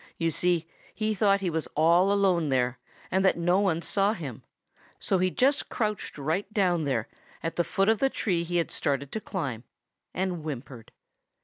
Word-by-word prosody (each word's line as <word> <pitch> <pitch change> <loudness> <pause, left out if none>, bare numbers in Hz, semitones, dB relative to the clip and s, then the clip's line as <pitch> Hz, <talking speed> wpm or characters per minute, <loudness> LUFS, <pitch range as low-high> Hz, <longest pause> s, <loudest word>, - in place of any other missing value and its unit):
You 165 -1 +1
see, 175 0 +1 0.3
he 215 0 0
thought 200 -1 +3
he 180 -3 -1
was 160 -1 -2
all 170 +5 +4
alone 185 -6 +2
there, 125 -1 +1 0.3
and 190 +1 +2
that 190 - +3
no 175 +2 +2
one 175 -5 +1
saw 200 +1 +2
him. 140 - -7 0.6
So 190 - 0
he 185 0 +2
just 270 +9 +1
crouched 215 -8 -2
right 160 +8 -2
down 180 -7 +1
there 125 -6 -1 0.4
at 165 - -2
the 175 - +2
foot 195 +3 0
of 220 -1 +3
the 270 - +3
tree 180 -9 -1
he 175 +1 -2
had 170 - 0
started 140 -1 -1
to 220 - -3
climb, 140 - -4 0.5
and 180 -2 -2
whimpered. 135 -5 -7
175 Hz, 185 wpm, -27 LUFS, 155-195 Hz, 0.6 s, all